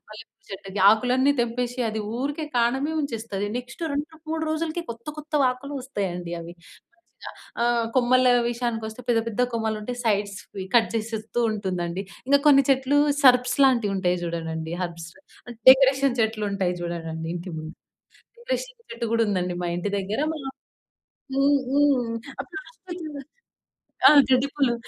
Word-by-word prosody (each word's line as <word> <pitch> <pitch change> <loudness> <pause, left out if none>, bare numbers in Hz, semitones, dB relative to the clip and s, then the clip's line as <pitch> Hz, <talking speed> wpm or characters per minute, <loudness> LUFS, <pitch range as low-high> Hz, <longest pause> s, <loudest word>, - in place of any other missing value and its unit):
మల్లెపువ్వు 215 +1 -14
చెట్టుకి, 195 +1 -7
ఆకులన్నీ 250 +5 +3
తెంపేసి 245 +1 -2
అది 220 0 -3 0.2
ఊరికే 290 +4 -3
కాం‌డమే 265 +6 +1
ఉంచేస్తాది. 225 -7 -3
నెక్స్ట్ 250 +6 -9
2,3 315 +2 -4
రోజులకి 320 +2 -2
కొత్త 235 +3 -19
కొత్త 300 0 -11
వకులు 255 +3 -2
వస్తాయండి 185 -9 -4
అవి. 170 +1 -9 0.4
మంచిగా 345 - -13 0.3
ఆ! - - +3 0.3
కొమ్మల 255 0 +4 0.3
విషయానికి 235 -2 -3
వస్తే 220 +3 -10
పెద్ద 230 -1 +3
పెద్ద 230 +2 -3
కొమ్మలు 220 -1 -1
ఉంటే 245 +4 -5
సైడ్స్‌వి 200 -2 -2
కట్ 225 - +4
చేసేస్తూ 220 +1 -3
ఉంటుందండి. 185 -3 -3 0.3
ఇంకా 280 +1 +6
కొన్ని 275 -1 +7
చెట్లు 265 +2 +2 0.3
సర్పస్ 250 -1 +5
లాంటివి 235 -6 +3
ఉంటాయి 180 -1 +1
చూడడండి. 160 -1 -4
హెర్బ్స్, 170 -1 -6 0.6
డెకరేషన్ 270 0 +6
చెట్లు 220 -1 0
ఉంటాయి 185 -3 0
చూడడండి 165 -1 -5
ఇంటి 175 +2 -6
ముం 155 0 -6 0.7
డెకరేషన్ - - -4
చెట్టు 235 0 -4
కూడా 230 - +3
ఉందండి 180 -3 -1
మా - - -1
ఇంటి 175 +3 -2
దగ్గర, 200 +4 -3
మా 315 - -6 1.0
హ్మ్. 280 +1 +4
హ్మ్. 275 -5 +2 0.3
ఆ - - -1
ప్లాస్టికు 355 -2 -9 1.0
ఆ - - +8 0.2
గడ్డి 260 +2 +3
పువ్వులు 270 -5 +2
235 Hz, 140 wpm, -24 LUFS, 200-275 Hz, 1.0 s, ఆ